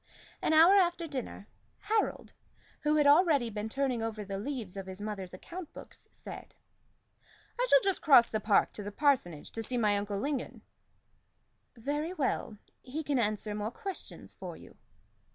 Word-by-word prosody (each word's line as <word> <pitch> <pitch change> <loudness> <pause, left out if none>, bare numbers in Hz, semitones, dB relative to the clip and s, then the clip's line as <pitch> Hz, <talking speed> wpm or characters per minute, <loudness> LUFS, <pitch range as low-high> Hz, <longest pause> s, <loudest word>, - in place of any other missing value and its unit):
An - - +1
hour 330 +5 +7
after 350 -2 +2
dinner, 260 -8 -6 0.3
Harold, 430 +1 -1 0.5
who 300 0 +1
had 300 -1 +4
already 290 -5 +5
been 210 +1 -4
turning 260 -1 -1
over 220 -2 -4
the 195 0 -4
leaves 225 -5 -4
of 195 -1 -6
his 190 +1 -7
mother's 205 -3 -5
account 335 - -9
books, - - -12
said - - -10 1.0
"I - - +2
shall - - +7
just 390 -1 0
cross 260 -6 +7
the 215 - 0
park 210 -1 +3
to - - -7
the 205 0 -6
parsonage 205 - +1
to 225 - -4
see 245 +3 -3
my 210 -3 +3
uncle 205 0 -2
Lingon." 275 +4 -3 1.1
"Very 295 +8 -2
well. 265 - -2 0.2
He 290 +5 -5
can 285 -3 0
answer 215 -1 -1
more 210 +1 -2
questions 390 - -7
for - - -8
you." - - -15
250 Hz, 165 wpm, -31 LUFS, 210-305 Hz, 1.1 s, hour